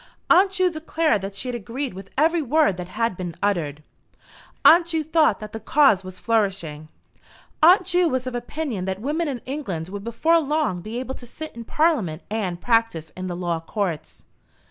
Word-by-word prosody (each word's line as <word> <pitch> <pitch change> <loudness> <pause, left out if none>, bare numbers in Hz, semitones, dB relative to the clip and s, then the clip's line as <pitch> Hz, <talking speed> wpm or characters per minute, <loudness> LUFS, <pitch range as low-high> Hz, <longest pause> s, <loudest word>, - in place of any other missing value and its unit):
Aunt 380 +3 +6
Ju 370 -1 +2
declared 315 - 0
that 195 0 -6
she 245 - -4
had 250 - -2
agreed 240 +3 -4
with 195 +1 -10
every 325 +3 +3
word 295 - +2
that 180 -1 -6
had 225 +1 -1
been 175 -2 -5
uttered. 155 -7 -1 0.8
Aunt 335 0 +8
Ju 325 -2 -1
thought 315 -8 +2
that 215 - -8
the 225 - -5
cause 220 -4 +4
was 185 0 -9
flourishing. 190 -9 -1 0.7
Aunt 360 +4 +7
Ju 355 -1 +2
was 255 -2 -1
of 255 - -4
opinion 245 -4 -4
that 190 0 -3
women 305 +8 -1
in 260 -5 -4
England 195 - -4
would 200 +1 -6
before 315 +9 +2
long 295 - -1
be 220 +6 -5
able 260 +1 -5
to 245 - -10
sit 310 +4 -8
in 235 -1 -8
Parliament 230 - +1
and 190 -6 -2
practise 225 -10 +1
in 185 0 -6
the 175 - -4
Law 175 -2 -2
Courts. 170 -1 -4
230 Hz, 190 wpm, -23 LUFS, 185-310 Hz, 0.8 s, Aunt